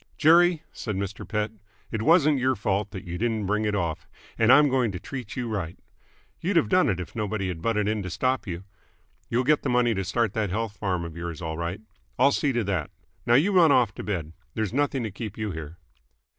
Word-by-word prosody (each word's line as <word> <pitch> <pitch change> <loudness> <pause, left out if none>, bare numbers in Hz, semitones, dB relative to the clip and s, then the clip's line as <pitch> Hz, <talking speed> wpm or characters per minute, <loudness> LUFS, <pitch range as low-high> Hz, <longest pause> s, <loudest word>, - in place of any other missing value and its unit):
"Jerry," 170 +1 +5
said 105 -4 -4
Mr. 100 0 -4
Pett, 105 0 -1 0.4
"it 110 - -2
wasn't 155 0 +4
your 130 +1 +2
fault 100 -1 -1
that 95 -3 -7
you 90 0 -6
didn't 110 -2 0
bring 105 +2 0
it 105 -1 0
off, 85 -5 -2 0.3
and 115 +1 +4
I'm 145 +3 +7
going 130 -5 +1
to 90 - -4
treat 125 -1 -7
you 125 -2 -3
right. 95 -6 -3 0.6
You'd 185 +3 -1
have 165 - +3
done 185 -1 +4
it 95 - 0
if 90 - -7
nobody 105 -3 -2
had 85 -3 -5
butted 105 0 0
in 105 0 0
to 90 - -5
stop 130 +9 -1
you. 90 0 -5 0.7
You'll 120 +2 +1
get 150 +3 +3
the 140 - -2
money 120 -1 +3
to 95 -2 -2
start 115 +4 0
that 110 -3 -1
health 110 +2 -2
farm 90 -4 -1
of 85 -1 -8
yours 85 -2 -5
all 80 -2 -4
right. 85 +5 -4 0.4
I'll 140 +3 +5
see 140 0 +1
to 120 -2 0
that. 95 -6 -2 0.4
Now 120 - +5
you 165 +10 +4
run 175 -5 +6
off 120 -6 +4
to - - -7
bed. 85 -6 -3 0.2
There's 110 -1 -2
nothing 140 -2 0
to 110 - -3
keep 105 +1 -7
you 105 -2 -2
here." 80 0 -7
110 Hz, 225 wpm, -26 LUFS, 95-130 Hz, 0.7 s, I'm